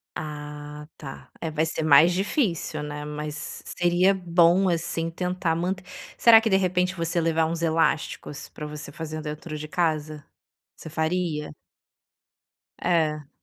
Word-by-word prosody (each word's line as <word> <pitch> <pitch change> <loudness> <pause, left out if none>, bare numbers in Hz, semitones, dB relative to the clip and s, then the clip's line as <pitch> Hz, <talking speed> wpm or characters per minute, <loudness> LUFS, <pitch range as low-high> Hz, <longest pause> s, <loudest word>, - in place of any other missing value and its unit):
Ah, 150 0 -7
tá, 135 -3 -9
é 160 -2 -3
vai 155 +1 +1
ser 160 0 -3
mais 155 +3 +7
difícil, 180 - -1
né, 150 0 -5
mas 150 0 -6
seria 175 +2 +3
bom, 175 +1 +4
assim, 165 -1 -1
tentar 180 -1 -1
manter 180 +2 -2 0.3
Será 230 -1 +8
que 225 - 0
de 190 - +5
repente 180 0 +1
você 170 0 -1
levar 165 0 +2
uns 165 +1 -3
elásticos 160 -3 0
para 150 - -8
você 150 -1 -7
fazer 155 0 -5
dentro 155 +1 -6
de 155 +1 -6
casa? 155 -3 -1 0.5
Você - - -9
faria? 160 -1 -1 1.3
É. 155 -4 +1
160 Hz, 140 wpm, -25 LUFS, 150-175 Hz, 1.3 s, Será